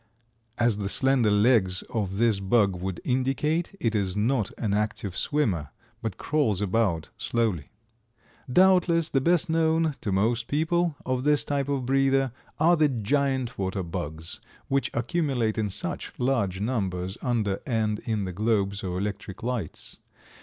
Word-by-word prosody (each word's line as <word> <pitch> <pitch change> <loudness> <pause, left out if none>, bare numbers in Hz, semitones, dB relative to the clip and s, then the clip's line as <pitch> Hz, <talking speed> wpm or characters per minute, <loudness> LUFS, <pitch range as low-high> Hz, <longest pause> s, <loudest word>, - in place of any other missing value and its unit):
As 120 -3 +2
the 100 -1 -2
slender 130 -1 +3
legs 105 -3 +3
of 100 -4 -3
this 115 -2 +2
bug 100 -1 +2
would 90 0 -4
indicate, 135 +8 0
it 115 -2 0
is 100 -2 -1
not 110 0 +1
an 105 -4 -1
active 105 -2 -2
swimmer, 100 - 0 0.3
but 110 -2 -4
crawls 140 -11 0
about 100 -5 0
slowly. 110 -11 -1 0.8
Doubtless 180 -1 +4
the 135 - +1
best 175 +4 +2
known, 160 -1 +2
to 105 - -2
most 115 +5 +1
people, 165 +2 +1
of 130 -1 -1
this 150 0 +3
type 140 -1 -1
of 135 -3 -1
breather, 135 0 +2 0.3
are 170 +3 +5
the 155 -2 +3
Giant 130 0 0
water 95 0 -2
bugs, 80 -1 -5 0.3
which 135 0 +1
accumulate 120 -3 0
in 105 -2 0
such - - -1
large 115 -8 0
numbers 95 -5 -2
under 110 -6 0
and 110 -4 0
in 110 -3 -2
the 90 - -5
globes 100 -1 0
of 90 -2 -3
electric 100 0 -5
lights. 120 -9 -4
115 Hz, 145 wpm, -26 LUFS, 100-135 Hz, 0.8 s, are